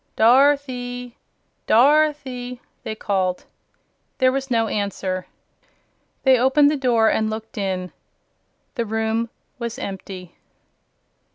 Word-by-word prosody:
"Dorothy! 250 -1 +2 0.5
Dorothy!" 260 -2 +2 0.2
they 220 - -5
called. 190 -4 -1 0.7
There 255 -1 +4
was 270 0 -3
no 230 -2 +2
answer. 195 -3 -3 1.0
They 260 -2 +5
opened 285 +3 +4
the - - 0
door 240 -5 +3
and 220 0 +1
looked 220 +1 -6
in. 185 -3 -3 0.8
The 235 -4 -2
room 225 +1 -1 0.3
was 235 -1 -4
empty. 185 -2 -7
235 Hz, 100 wpm, -22 LUFS, 210-260 Hz, 1.0 s, They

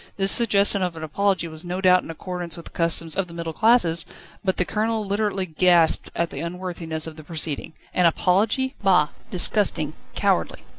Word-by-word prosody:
This 195 -1 +3
suggestion 200 -3 +4
of 180 -2 -2
an 160 - -8
apology 190 +3 0
was 155 -1 -8
no 180 +1 -4
doubt 185 -1 +4
in - - -12
accordance 175 0 -5
with 170 - -10
the - - -11
customs 165 -1 0
of 195 -1 -1
the 170 - -12
middle 165 -1 -5
classes, 195 -6 +3 0.4
but 190 -2 0
the 180 - +2
Colonel 220 +1 -1
literally 200 -1 -1
gasped 170 0 +3
at 170 0 -1
the - - -6
unworthiness 170 -2 -4
of 160 -1 -8
the 155 - -10
proceeding. 155 -1 -4 0.2
An 180 -1 +4
apology? 210 - +1
Bah! 180 -7 +3 0.2
Disgusting! 180 -5 +2 0.2
cowardly! - - 0
180 Hz, 185 wpm, -23 LUFS, 165-195 Hz, 0.4 s, suggestion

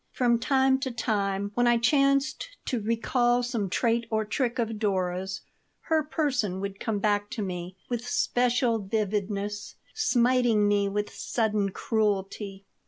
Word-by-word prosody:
From 240 -2 +2
time 265 0 +3
to 265 -1 -2
time, 200 -4 -1
when 245 +2 +2
I 240 0 +5
chanced 275 - +2 0.2
to 245 -4 -1
recall 240 +2 +1
some 230 -5 -2
trait 230 +3 +1
or 220 -1 0
trick 245 +3 -1
of 225 -3 -2
Dora's, 190 -2 -1 0.4
her 320 -1 +1
person 260 - -1
would 195 0 -5
come 220 -2 -1
back 205 0 +1
to 215 - -3
me 180 0 -5
with 240 0 -3
special 245 -2 +1
vividness, 205 0 -2 0.2
smiting 245 - +3
me 205 -1 +2
with 205 +1 -2
sudden 215 -3 0
cruelty. 200 -1 -2
220 Hz, 140 wpm, -27 LUFS, 200-245 Hz, 0.4 s, I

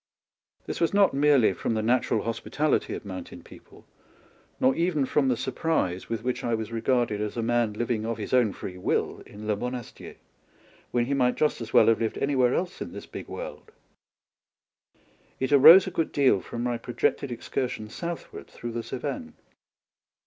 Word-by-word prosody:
This - - -5
was 170 +3 +2
not 200 -5 +5
merely 140 -6 +4
from 115 - -2
the 110 - -1
natural 115 -2 +1
hospitality 145 +6 -1
of - - -8
mountain 95 -2 -8
people, - - -16 0.7
nor 130 +1 +4
even 165 -5 +1
from 135 +1 +1
the 125 -2 +1
surprise 95 - -1
with 115 -1 -3
which 125 0 -2
I 120 -1 0
was 110 0 -5
regarded 115 -2 0
as 105 +2 -4
a 115 - -1
man 120 -2 +1
living 115 0 -2
of 115 0 -3
his 105 +1 -6
own 120 -5 +4
free 90 -1 -8
will - - -1
in 105 +1 -10
Le 105 -1 +1
Monasticr, 125 +2 -6 0.7
when 120 -1 +1
he 140 - -1
might 125 -2 +2
just 150 -5 0
as 115 0 -6
well 110 - +6
have 115 +1 +3
lived 110 - -1
anywhere 130 -3 +2
else 180 0 -3
in - - -6
this - - -8
big - - -9
world; - - -8 1.7
it 130 - -1
arose 155 +7 +9
a - - -4
good 165 - -1
deal 135 -9 +3
from 120 - -6
my 120 -1 -1
projected 120 +2 -1
excursion 120 -1 -3
southward 170 +9 -7
through 120 - -7
the 115 0 -3
Cevennes. - - -5
120 Hz, 180 wpm, -26 LUFS, 110-140 Hz, 1.7 s, arose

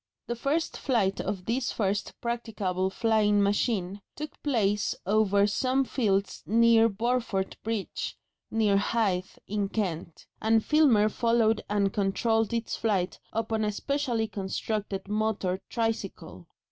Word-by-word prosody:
The 240 - -3
first 285 +7 -1
flight 215 -7 +1
of 190 -2 -4
this 245 +2 0
first 200 -2 -2
practicable 210 -6 -2
flying 210 -1 +2
machine 200 -1 0
took 300 0 -7
place 210 -7 +1
over 205 0 +3
some 260 +6 +1
fields 200 -7 0
near 230 0 +5
Burford 225 -3 -1
Bridge, 220 -3 -3 0.3
near 215 -3 +2
Hythe, 200 -3 0
in 205 -1 -1
Kent, 175 -6 -3 0.2
and 220 0 +3
Filmer 275 -9 +5
followed 225 0 +2
and 200 -1 +1
controlled 225 +3 +1
its 230 -1 -2
flight 195 -5 -1
upon 220 0 -1
a 210 - +1
specially 245 -1 -1
constructed 200 0 -3
motor 210 -3 -1
tricycle. 205 - -3
215 Hz, 120 wpm, -28 LUFS, 195-230 Hz, 0.3 s, near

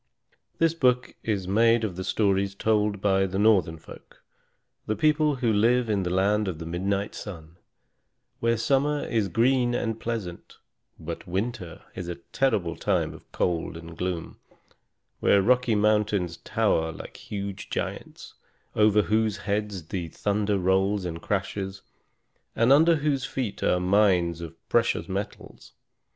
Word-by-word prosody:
This 165 -1 +3
book 125 -6 +1
is 100 -5 -2
made 115 +3 +3
of 100 -5 -2
the 95 - -4
stories 100 -1 +1
told 105 -1 +1
by 95 -1 +2
the 95 +1 -4
Northern 100 -6 +3
folk, - - -15 0.6
the 110 - 0
people 155 0 +2
who 120 -4 +1
live 115 +2 +3
in 100 -2 +1
the 90 - -2
land 100 +3 +2
of 90 -4 -3
the 80 - -7
midnight 95 +4 -2
sun, 85 -5 -9 0.8
where 115 0 +1
summer 140 +5 +1
is 110 -4 0
green 120 +5 +2
and 115 -2 -2
pleasant, 110 -8 -5 0.4
but 85 +1 -7
winter 95 -1 -4
is 90 - -6
a 85 - -4
terrible 85 -3 -1
time - - 0
of - - -16
cold 85 -2 -1
and 85 0 -10
gloom; 90 -1 -4 0.8
where 100 - +4
rocky 125 +2 +3
mountains 105 -4 +1
tower 80 0 0
like - - -10
huge 100 -2 -6
giants, - - -5 0.4
over 105 -1 +4
whose 110 0 +1
heads 105 -3 -2
the 90 -4 -3
thunder 105 +4 -1
rolls 95 +1 +1
and 85 -1 -5
crashes, 95 -1 -3 0.7
and 115 +4 +5
under 165 +4 +5
whose 145 -3 0
feet 125 -6 -4
are 90 - +2
mines 90 -3 +2
of 85 -1 -8
precious - - +1
metals. 100 +1 -6
100 Hz, 145 wpm, -26 LUFS, 90-115 Hz, 0.8 s, and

